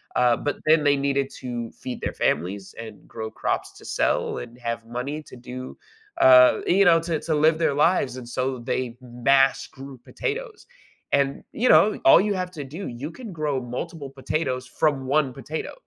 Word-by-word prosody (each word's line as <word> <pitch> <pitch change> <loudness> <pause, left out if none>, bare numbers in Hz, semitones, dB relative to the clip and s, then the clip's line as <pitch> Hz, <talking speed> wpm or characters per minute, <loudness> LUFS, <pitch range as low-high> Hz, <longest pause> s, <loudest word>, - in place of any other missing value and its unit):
Uh, 125 -1 +3
but 145 - -2
then 155 -1 +5
they 145 -1 +4
needed 140 -1 0
to 120 -2 -5
feed 125 - -7
their - - -3
families 95 +4 -2
and 115 -1 -10
grow 110 -1 -6
crops - - -2
to - - -16
sell - - 0
and 120 0 -10
have 115 -1 -4
money 130 +6 -5
to - - -13
do 125 +1 -8 0.5
uh, 125 -1 +7
you 195 +2 +4
know, 165 -1 +6
to 165 -1 -2
to 160 - -1
live 155 +2 +3
their 160 -4 +1
lives, 145 -4 +2
and 125 - -8
so 130 +1 -2
they 120 0 -3
mass 135 +3 +2
grew 135 -1 -11
potatoes. 445 - -5 0.5
And, 140 -1 +1
you 250 +3 +1
know, 210 +1 +5
all 135 - +8
you 205 +1 0
have 180 -1 -3
to 150 -5 -7
do 160 +9 -7
you 125 +5 -6
can 225 0 -9
grow 150 -4 -1
multiple 140 +5 -6
potatoes 130 -1 -3
from 135 -2 0
1 140 -2 +1
potato. 145 +5 -6
135 Hz, 185 wpm, -24 LUFS, 125-155 Hz, 0.5 s, all